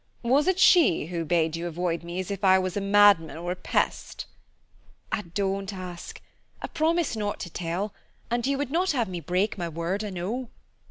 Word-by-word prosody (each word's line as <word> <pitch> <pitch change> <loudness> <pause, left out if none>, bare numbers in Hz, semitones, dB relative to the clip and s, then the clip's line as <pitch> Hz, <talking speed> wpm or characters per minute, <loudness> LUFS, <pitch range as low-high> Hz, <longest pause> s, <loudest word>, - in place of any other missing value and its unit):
Was 270 +7 +3
it 375 -1 +3
she 345 - +5
who 170 0 -3
bade 165 0 +1
you 170 +1 -3
avoid 170 0 -2
me 170 +2 -5
as 185 +1 -4
if 200 0 -5
I 190 -1 +6
was 185 -1 -2
a 205 - -1
madman 200 -5 +5
or 175 +2 -4
a - - -2
pest?" 180 - -2 0.9
"Ah, - - 0
don't 195 0 -1
ask. 180 -3 -8 0.4
I - - -5
promised 330 -3 0
not 205 -1 -3
to 175 - -6
tell, 180 +5 -3 0.4
and 240 +1 0
you 275 0 +1
would 280 -1 -3
not 360 +2 +1
have 240 -5 0
me 180 -2 -5
break 180 +6 -1
my 170 -1 -2
word, 170 +6 -2
I 210 - -4
know." 210 +7 -4
190 Hz, 200 wpm, -26 LUFS, 175-230 Hz, 0.9 s, I